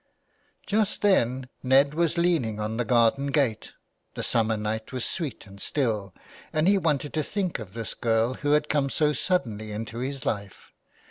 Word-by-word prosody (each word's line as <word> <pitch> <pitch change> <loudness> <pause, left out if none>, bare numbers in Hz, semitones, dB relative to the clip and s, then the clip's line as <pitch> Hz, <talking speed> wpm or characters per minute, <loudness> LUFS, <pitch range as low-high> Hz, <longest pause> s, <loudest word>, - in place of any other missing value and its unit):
Just 210 -1 0
then 130 - +2
Ned 135 +2 +4
was 170 +1 +1
leaning 160 -12 +1
on 110 +1 -2
the 120 - 0
garden 120 +4 +3
gate. 135 -7 0 0.4
The - - -3
summer 110 -1 +1
night 110 +1 -3
was 130 -2 -2
sweet 155 -10 -4
and 100 0 -12
still, 110 -9 -1 0.4
and 155 +2 +1
he 200 0 +5
wanted 150 -4 0
to 155 - +1
think 190 - -2
of 105 -2 -9
this 115 -2 -4
girl 115 +1 +1
who 145 +3 0
had 150 0 +3
come 145 -2 +1
so 150 +1 +2
suddenly 115 - -1
into 110 +2 -5
his 135 0 -4
life. 100 -2 -4
130 Hz, 175 wpm, -26 LUFS, 110-150 Hz, 0.4 s, he